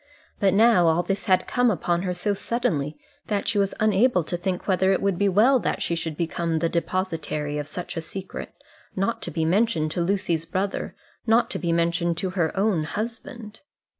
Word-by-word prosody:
But 195 Hz, -2 st, +3 dB
now 220 Hz, -5 st, +5 dB
all 165 Hz, +2 st, +3 dB
this 195 Hz, +3 st, -2 dB
had 185 Hz, -3 st, +3 dB
come 245 Hz, -1 st, +2 dB
upon 175 Hz, -3 st, 0 dB
her 180 Hz, -1 st, -1 dB
so 205 Hz, +3 st, 0 dB
suddenly, 160 Hz, -, -1 dB, 0.3 s
that 205 Hz, -2 st, -1 dB
she 215 Hz, -3 st, +1 dB
was 195 Hz, -1 st, 0 dB
unable 215 Hz, -2 st, +3 dB
to 175 Hz, -, -3 dB
think 180 Hz, +1 st, -3 dB
whether 190 Hz, 0 st, +3 dB
it -, -, +2 dB
would 195 Hz, -3 st, 0 dB
be 200 Hz, -1 st, +3 dB
well 235 Hz, +8 st, +5 dB
that -, -, -1 dB
she -, -, -1 dB
should 165 Hz, -2 st, -3 dB
become 165 Hz, 0 st, -1 dB
the 165 Hz, +1 st, 0 dB
depositary 165 Hz, -4 st, -2 dB
of 145 Hz, -, -4 dB
such 175 Hz, +4 st, -6 dB
a 165 Hz, -, -2 dB
secret, 190 Hz, +3 st, -7 dB, 0.4 s
not 195 Hz, +5 st, -1 dB
to -, -, -3 dB
be 160 Hz, -2 st, -1 dB
mentioned 180 Hz, -3 st, +1 dB
to 175 Hz, -, -1 dB
Lucy's 170 Hz, -3 st, 0 dB
brother, 195 Hz, +2 st, -2 dB, 0.3 s
not 225 Hz, +2 st, +3 dB
to -, -, -2 dB
be 170 Hz, -2 st, -1 dB
mentioned 170 Hz, 0 st, +1 dB
to 185 Hz, +1 st, -2 dB
her 170 Hz, -4 st, 0 dB
own 195 Hz, -6 st, +1 dB
husband. 220 Hz, +1 st, -6 dB
185 Hz, 195 wpm, -24 LUFS, 170-205 Hz, 0.4 s, now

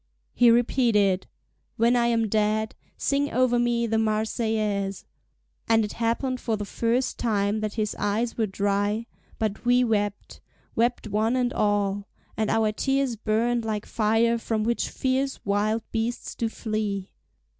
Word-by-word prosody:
He 240 Hz, -, +5 dB
repeated: 230 Hz, -5 st, +3 dB, 0.5 s
"When 235 Hz, +2 st, +4 dB
I 240 Hz, -1 st, +3 dB
am 230 Hz, -1 st, +2 dB
dead 215 Hz, +1 st, +1 dB, 0.2 s
sing 285 Hz, +1 st, 0 dB
over 245 Hz, -1 st, +2 dB
me 240 Hz, -1 st, +1 dB
the 225 Hz, -1 st, +1 dB
Marseillaise." 215 Hz, -2 st, -1 dB, 0.6 s
And 225 Hz, -1 st, +4 dB
it 210 Hz, -, -6 dB
happened 245 Hz, +3 st, -1 dB
for 225 Hz, -2 st, -1 dB
the 205 Hz, -, -4 dB
first 235 Hz, +5 st, -1 dB
time 210 Hz, -2 st, +1 dB
that 215 Hz, -1 st, -3 dB
his 215 Hz, -2 st, -1 dB
eyes 215 Hz, +4 st, 0 dB
were 220 Hz, -2 st, 0 dB
dry, 205 Hz, +3 st, 0 dB, 0.3 s
but 215 Hz, -2 st, -2 dB
we 245 Hz, +1 st, +4 dB
wept, 205 Hz, -3 st, -2 dB, 0.3 s
wept 235 Hz, 0 st, +1 dB
one 215 Hz, +4 st, +1 dB
and 250 Hz, -1 st, 0 dB
all: 205 Hz, -1 st, 0 dB, 0.3 s
and 220 Hz, -1 st, 0 dB
our 220 Hz, -1 st, +2 dB
tears 270 Hz, +2 st, 0 dB
burned 230 Hz, +2 st, 0 dB
like 215 Hz, -2 st, -3 dB
fire 225 Hz, +2 st, +2 dB
from 225 Hz, -1 st, -1 dB
which 235 Hz, +2 st, 0 dB
fierce 265 Hz, +1 st, -1 dB
wild 210 Hz, +3 st, +1 dB
beasts 230 Hz, +1 st, -2 dB
do 230 Hz, -, -2 dB
flee. 215 Hz, -4 st, -3 dB
220 Hz, 145 wpm, -25 LUFS, 210-235 Hz, 0.6 s, He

